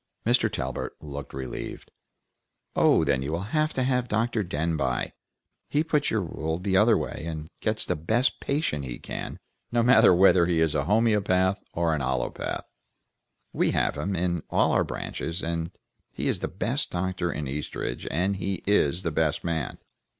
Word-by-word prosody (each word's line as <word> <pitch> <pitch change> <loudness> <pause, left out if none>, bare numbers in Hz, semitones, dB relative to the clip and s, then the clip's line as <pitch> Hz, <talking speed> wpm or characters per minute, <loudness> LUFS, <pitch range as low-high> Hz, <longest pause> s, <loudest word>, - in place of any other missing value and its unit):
Mr. 120 -1 +3
Talbert 65 -2 -3
looked 70 -2 -7
relieved. 65 -2 -6 0.8
"Oh, - - +5
then 65 -2 +1
you 70 +3 -3
will 95 +7 -4
have 155 0 +2 0.3
Dr. 115 0 +1
Denbigh. 80 -6 -1 0.6
He 150 +2 +2
puts 150 -3 +1
your 110 - +1
rule 80 -1 -3
the 95 +1 -1
other 95 - +6
way, - - -4
and 80 -1 -5
gets - - +1
the - - 0
best 110 - +1
patient 140 - -1
he 60 -2 -5
can, - - -6 0.3
no 120 -1 +3
matter 115 -4 +7
whether 90 -1 +6
he 85 -2 +2
is 80 -2 +2
a - - 0
homoeopath 100 -3 +2
or 85 -1 +1
an 75 - -1
allopath. 65 0 -2 0.9
We - - +2
have - - +1
him, 95 +1 -2
in 85 -1 0
all - - +3
our - - +3
branches; 85 +3 -4 0.7
he - - -3
is - - +1
the - - -2
best 120 +9 -2
doctor 90 -1 -1
in 75 -2 -4
Eastridge, 70 +3 -4
and 95 +3 0
he 95 -1 -3
is 90 -3 +2
the 85 - -1
best 75 0 0
man. 80 -3 -2
90 Hz, 165 wpm, -27 LUFS, 80-105 Hz, 0.9 s, matter